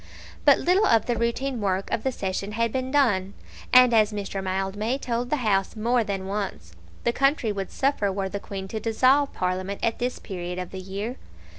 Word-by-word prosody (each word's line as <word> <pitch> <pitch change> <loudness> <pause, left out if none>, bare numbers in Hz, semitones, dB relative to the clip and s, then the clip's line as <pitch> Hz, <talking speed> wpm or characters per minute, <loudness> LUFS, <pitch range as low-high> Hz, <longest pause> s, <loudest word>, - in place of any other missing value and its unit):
But - - +7
little 380 +5 +3
of 225 -2 +4
the 240 - 0
routine 235 +2 -1
work 195 -1 -1
of - - 0
the 265 - 0
session 195 -1 -3
had 230 0 0
been 260 +1 -2
done; 205 -9 +2 0.4
and, 250 -1 +7
as 215 -1 +4
Mr. 200 -2 -4
Mildmay 195 +6 -1
told 245 -2 -2
the 300 - +2
House 195 -1 +1
more 235 +2 +1
than 195 -3 -3
once, 195 - -4 0.3
the 235 - +1
country 275 -4 +2
would 195 -2 -4
suffer 265 -8 0
were 195 0 -2
the 200 +1 -4
Queen 195 -1 -6
to 220 - -3
dissolve 255 +6 +3
Parliament 185 +2 -2
at 230 - 0
this 250 +1 -1
period 180 -2 -6
of 180 -1 -5
the 190 - -6
year. 200 +6 -5
215 Hz, 195 wpm, -25 LUFS, 195-245 Hz, 0.4 s, But